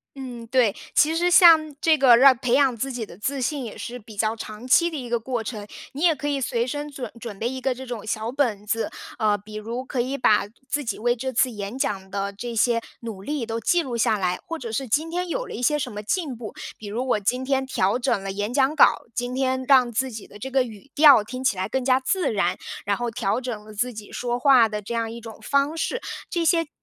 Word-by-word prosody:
嗯， 250 -4 -7
对， 240 -5 +2 0.2
其 315 +2 +4
实 350 +2 +2
像 320 -4 +7
这 315 -1 +4
个 255 -4 +7
让 265 0 +7
培 250 -1 -1
养 270 -2 +4
自 270 +4 -3
己 240 -3 -4
的 175 - -13
自 265 +6 -2
信 280 +2 -1
也 225 - -7
是 245 +1 -6
比 215 -2 -14
较 220 +2 +1
长 220 +2 -8
期 340 +6 +4
的 310 - -4
一 245 - -7
个 235 - +1
过 245 0 -2
程， 215 -2 -6 0.3
你 280 - -6
也 340 -1 +5
可 295 -1 -5
以 280 -2 -1
随 235 -1 0
身 290 +3 -4
准 265 -3 -6
准 225 -4 -8
备 230 - -1
一 260 +1 -4
个 265 -1 +1
这 260 +1 -9
种 230 -4 -6
小 220 +1 -2
本 235 -6 -1
子。 225 +2 0 0.3
呃， 210 -2 +2
比 210 +2 -12
如 230 +4 -5
可 260 -3 -1
以 260 +3 -2
把 210 -5 +3 0.2
自 290 +2 -1
己 230 - -3
为 240 +2 +1
这 260 +2 -3
次 255 +1 +2
演 205 +1 -6
讲 190 -6 -2
的 200 0 -3
这 235 +4 -6
些 230 +1 +2 0.2
努 225 -5 -7
力 280 +3 -3
都 225 0 -3
记 350 +10 +2
录 260 -6 -4
下 220 -2 +2
来， 180 -2 0
或 330 0 -5
者 235 - -6
是 260 +5 -2
今 300 +8 0
天 355 +1 -3
有 - - -2
了 - - -8
一 - - -5
些 295 +4 +2
什 255 -5 -4
么 210 0 -6
进 280 - -2
步， 225 -2 -8 0.2
比 210 - -9
如 240 +6 -3
我 245 - +2
今 250 +6 0
天 270 0 +1
调 200 -4 +1
整 245 -5 0
了 195 0 -4
演 205 +4 -3
讲 275 +2 +2
稿， 310 - +5
今 245 0 -2
天 260 0 0
让 255 -3 +5
自 260 +3 0
己 220 -2 -8
的 205 - -13
这 265 +6 -7
个 265 0 +3
语 230 +3 -11
调 290 -8 +7
听 255 +4 -7
起 260 -5 +2
来 185 +2 -3
更 260 +1 -2
加 260 0 +3
自 355 +2 0
然， 180 -4 +1 0.3
然 200 0 0
后 240 0 -2
调 215 0 -1
整 240 -5 -5
了 215 0 -12
自 245 +4 -1
己 210 -1 -10
说 240 0 -2
话 255 -3 +6
的 210 -1 -4
这 210 +3 -6
样 230 -1 -1
一 235 +1 -8
种 225 -1 -10
方 280 +3 +1
式。 475 +8 -2 0.3
这 345 -2 -1
些 330 -1 +2
245 Hz, 275 characters per minute, -24 LUFS, 215-270 Hz, 0.3 s, 像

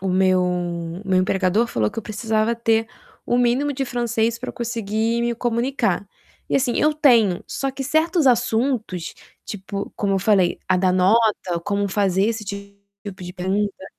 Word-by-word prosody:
o 190 - -3
meu 185 0 +3
o 175 0 -3
meu 185 -1 +3
empregador 190 +4 +1
falou 110 - -1
que - - -7
eu - - -3
precisava 220 +1 -1
ter 225 -1 +1 0.4
o 240 - +1
mínimo 250 +4 +2
de 270 0 -2
francês 235 -2 -1
pra 255 - -5
eu - - -15
conseguir 230 -1 -2
me 235 0 0
comunicar. 240 +3 -1 0.4
E, - - -2
assim, 250 -3 0
eu 305 0 +3
tenho, 235 - +4
só 270 0 -2
que 270 +1 -6
certos 315 +2 +1
assuntos, 230 -6 0 0.3
tipo, 200 0 -6
como 200 -1 0
eu 195 - +2
falei, 190 -3 +2
a 185 - +3
da 180 0 +2
nota, 190 -1 +2
como 200 0 -1
fazer 195 -1 +1
esse 225 -1 -2
tipo 200 -1 -10
de 180 - -7
pergunta. 195 +1 -2
215 Hz, 170 wpm, -22 LUFS, 190-235 Hz, 0.4 s, tenho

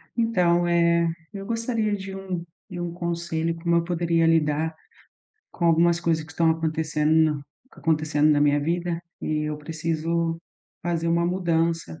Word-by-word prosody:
Então, 180 -7 +2
eh, 170 0 +3 0.3
eu 195 -1 -6
gostaria 230 -2 -1
de 195 0 -7
um 185 -3 -4 0.3
de 175 -2 -5
um 175 -1 -3
conselho, 170 -1 -2
como 170 0 +1
eu 170 - +2
poderia 170 -1 +1
lidar 160 0 +1 0.8
com 170 - -3
algumas 170 +1 +4
coisas 165 -2 0
que 160 - -13
estão 165 0 +3
acontecendo 155 -1 0 0.2
na 140 - -9 0.3
acontecendo 155 -1 +1
na 145 -1 +3
minha 145 0 +4
vida, 170 +2 -1 0.2
e 155 0 -1
eu 150 0 -2
preciso 165 +1 -2 0.4
fazer 170 -1 -1
uma 170 +1 +2
mudança 165 - 0
170 Hz, 150 wpm, -25 LUFS, 160-175 Hz, 0.8 s, algumas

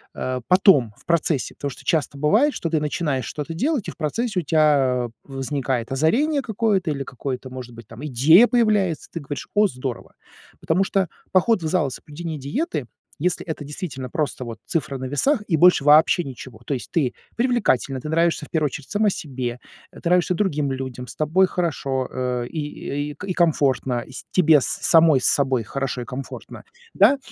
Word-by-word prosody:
э, 130 0 -3
потом, 180 - +5
в - - -22
процессе, 160 -4 0
потому 140 - -4
что - - -13
часто 150 -3 0
бывает, 215 - +3
что 170 - -3
ты 160 -2 0
начинаешь 150 -3 -1
что-то 150 +2 -5
делать, 265 - -1
и - - -3
в - - -16
процессе 200 +5 -1
у - - -11
тебя 140 -6 +2
возникает 135 -3 -3
озарение 265 - +2
какое-то 210 -7 0
или 140 -2 -3
какое-то, 130 0 -5
может 125 -2 -8
быть 115 -2 -12
там 115 +6 -9
идея 150 - +6
появляется, 210 - +1
ты 165 - -5
говоришь: 145 0 -6
"О, 210 0 +5
здорово!" 130 -6 -6 0.4
Потому 165 +3 +1
что 195 -1 0 0.2
поход 190 +1 +3
в - - -1
зал 160 -2 +1
и - - -5
соблюдение 155 +4 -7
диеты, 145 - -3 0.4
если 180 -1 0
это 160 -3 -5
действительно 145 -3 -6
просто 140 -2 -2
вот 115 -1 -7
цифра 140 -4 -2
на 130 - -5
весах 210 - +1
и 170 - +2
больше 175 -2 +5
вообще 155 +4 +5
ничего. 130 -4 -9
То 145 - -2
есть 130 - -5
ты 145 -8 +1 0.2
привлекательна, 220 - +1
ты 150 - -6
нравишься 165 -1 +1
в - - -32
первую 160 -2 0
очередь 140 0 -8
сама 210 0 +2
себе, 125 -7 -5 0.3
ты - - -14
нравишься 180 +1 +3
другим 150 -7 0
людям, 130 -2 -5
с - - -10
тобой 160 +5 +3
хорошо, 140 -8 -2
э, 125 -1 -2
и 145 -1 -4
и 145 - -13
и 195 -2 -2
комфортно, 135 -8 +1
с 130 - -8
тебе 160 -4 +5
самой 160 -1 +4
с - - -1
собой 130 -4 +2
хорошо 135 +2 -3
и - - -6
комфортно, 130 +3 -8 0.3
да, 230 +8 +5
150 Hz, 185 wpm, -22 LUFS, 130-180 Hz, 0.4 s, идея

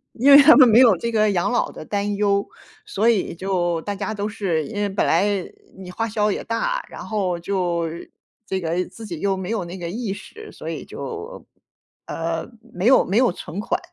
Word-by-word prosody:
因 260 +5 +3
为 280 +1 +11
他 310 +3 +8
们 260 -3 +8
没 230 0 +6
有 235 -7 +6
这 235 +7 -3
个 215 -2 +2
养 180 +4 0
老 245 - 0
的 - - -10
担 205 +2 -2
忧， 200 -1 +1 0.4
所 220 +4 +1
以 215 -5 +1
就 175 -2 -1
大 205 +4 -4
家 215 +2 -4
都 205 0 -3
是 190 -8 -2
因 220 - -9
为 205 - 0
本 195 - 0
来 170 +4 +3 0.5
你 190 -1 -10
花 225 +5 -3
销 210 0 +1
也 - - -3
大， - - -2
然 - - -9
后 190 -5 -2
就 175 -2 -1 0.6
这 190 - -2
个 170 +1 -1
自 225 - -11
己 170 -6 -6
又 195 -1 0
没 190 0 -5
有 220 -4 -1
那 175 +2 -8
个 170 -2 -5
意 215 +1 -3
识， 430 - -11
所 - - -8
以 - - -5
就， 450 +2 -8 0.6
呃， 165 0 -3 0.2
没 185 +4 -1
有 265 - +6
没 195 - 0
有 250 -4 +4
存 175 +1 -8
款。 - - -1
200 Hz, 230 characters per minute, -22 LUFS, 180-225 Hz, 0.6 s, 为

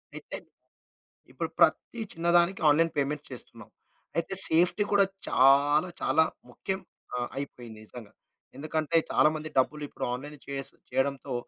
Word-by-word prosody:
అయితే, - - -5 0.9
ఇప్పుడు - - -4
ప్రతి 235 - +2
చిన్నదానికి 170 +2 +2
ఆన్‌లైన్ 165 +3 +3
పేమెంట్ 145 +1 -1
చేస్తున్నాం. 115 -3 -10 0.5
అయితే, 170 +3 -1
సేఫ్టీ 175 +5 +3
కూడా 200 -1 +5 0.2
చాలా, 145 +5 +4
చాలా 160 - +3 0.3
ముఖ్యం 190 +9 -4 0.4
ఆహ్, 120 0 -3
అయిపోయింది 120 -5 -7
నిజంగా. 110 -2 -12 0.4
ఎందుకంటే, 155 +2 -1
చాలామంది 155 0 +2
డబ్బులు 150 +3 +1
ఇప్పుడు - - -5
ఆన్‌లైన్ 145 +4 -7
చేస్ 135 -1 -5 0.2
చేయడంతో, 135 0 -1
150 Hz, 120 wpm, -28 LUFS, 135-165 Hz, 0.9 s, కూడా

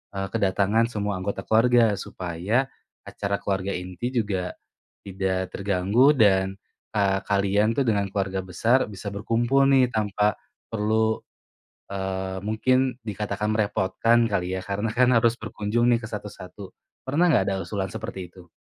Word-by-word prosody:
eee, 95 0 -2
kedatangan 105 +1 +2
semua 105 -2 -2
anggota 100 +2 -4
keluarga, 115 0 +4
supaya 90 +9 -2 0.4
acara 100 0 -2
keluarga 95 0 -2
inti 90 +6 -4
juga 100 -6 -1 0.5
tidak 95 -1 -2
terganggu 100 +7 +3
dan, 95 -3 +3 0.4
eee, 100 -2 +2
kalian 100 +2 +2
tuh 140 - +3
dengan 100 -2 +1
keluarga 95 -1 -1
besar 115 +8 +2
bisa 100 +1 -8
berkumpul 120 +6 +1
nih 130 -2 +4
tanpa 105 -1 +1 0.4
perlu, 110 0 +1 0.7
eee, 95 -1 -3
mungkin 125 +4 +1
dikatakan 105 -1 -3
merepotkan 110 +3 +2
kali 90 -1 -1
ya. - - -4
Karena 105 +2 -2
kan 125 +1 +4
harus 115 0 +3
berkunjung 110 +2 -1
nih 120 - +3
ke - - -5
satu-satu, 100 -2 -8 0.4
pernah 155 +7 +3
nggak 95 -10 +3
ada 95 -1 -2
usulan 95 +2 -3
seperti 110 -4 -6
itu? 90 -1 -16
105 Hz, 140 wpm, -25 LUFS, 95-115 Hz, 0.7 s, keluarga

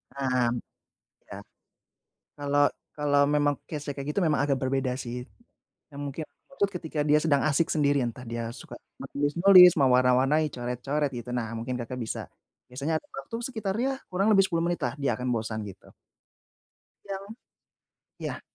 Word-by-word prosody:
Nah, 130 -3 +1 0.8
ya. - - -8 1.0
Kalo 145 0 -2 0.4
kalo 145 -1 +1 0.2
memang 145 -1 +3
case-nya 145 -2 -4
kayak 140 +1 -5
gitu, 200 - 0
memang 155 -5 +2
agak 140 -2 +1
berbeda 130 -1 0
sih. 125 0 -5 0.7
Ya 140 - -13
mungkin 145 +2 -5 0.3
tuh 200 -1 +2
ketika 160 -5 -3
dia 150 0 +4
sedang 150 -3 +2
asik 155 +2 +2
sendirian, 140 -6 +1
entah 125 - -10
dia 115 0 -4
suka - - -10 0.3
menulis-nulis, 175 +5 +6
mewarna-warnai, 130 +2 +4
coret-coret, 125 +4 -2
gitu, 125 -1 -6
nah 115 -3 -2
mungkin 115 +2 -4
Kakak 125 +1 -5
bisa, 115 -2 -5 0.4
biasanya 140 +6 -2
atur - - -28
waktu 135 +12 -6
sekitar, 215 -6 -3
ya 270 0 -1
kurang 195 +4 +1
lebih 195 -2 +5
10 165 -1 -1
menitlah, 165 -8 -1
dia 120 -5 0
akan 125 -1 -1
bosan, 110 -1 -3
gitu. 95 - -12 1.2
Ya. 195 -1 -4 1.0
Ya. - - -5
140 Hz, 150 wpm, -27 LUFS, 125-160 Hz, 1.2 s, menulis-nulis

